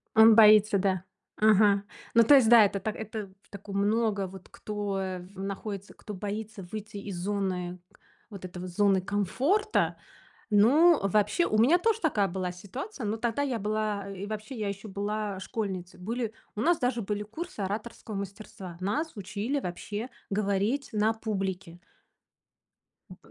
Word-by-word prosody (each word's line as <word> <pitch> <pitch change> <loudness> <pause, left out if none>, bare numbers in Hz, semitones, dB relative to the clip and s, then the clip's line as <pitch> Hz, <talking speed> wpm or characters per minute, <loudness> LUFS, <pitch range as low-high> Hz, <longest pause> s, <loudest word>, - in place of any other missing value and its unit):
Он 220 0 +8
боится, 215 -1 +7
да, 190 -2 0 0.3
ага. 205 -1 +4 0.3
Ну, 230 - +7
то 290 - +7
есть, 255 -5 +6
да, 230 -3 +9
это 200 0 -1
так, 215 +2 -3
это 220 -1 -5 0.2
в - - -30
такой 200 0 -9
много 205 0 +1
вот 190 0 -12
кто, 205 -2 -4
э, 185 -1 -3
в 190 +2 -10
находится, 200 0 -5
кто 210 - -9
боится 210 +1 -5
выйти 215 -1 -6
из 200 -2 -6
зоны, 180 -1 -2
к - - -24 0.3
вот 200 -3 -9
этой 180 0 -7
вот 180 0 -6
зоны 195 +1 +3
комфорта. 255 - +1 0.6
Но 290 +11 +6
вообще, 210 - +2
у 215 - 0
меня 255 +11 +5
тоже 450 +4 +1
такая 220 - +2
была 185 0 -3
ситуация, 245 - -7
но 210 +1 -1
тогда 235 +3 -1
я 270 -4 0
была, 210 -1 -2
э, 195 -1 -7
и - - -2
вообще 215 +5 -6
я 210 - -1
ещё 200 +2 -5
была 205 0 -3
школьницей. 190 -3 -5
Были 230 +3 -3 0.2
у 210 - -2
нас 345 +4 +3
даже 245 -2 0
были 210 0 -3
курсы 315 - -7
ораторского 210 +2 -5
мастерства. 195 -2 -7
Нас 285 - -2
учили 210 +7 -2
вообще 210 +3 -5 0.2
говорить 205 +6 0
на 215 +1 +2
публике. 190 -5 -4 1.3
М, - - -11
210 Hz, 165 wpm, -28 LUFS, 195-225 Hz, 1.3 s, да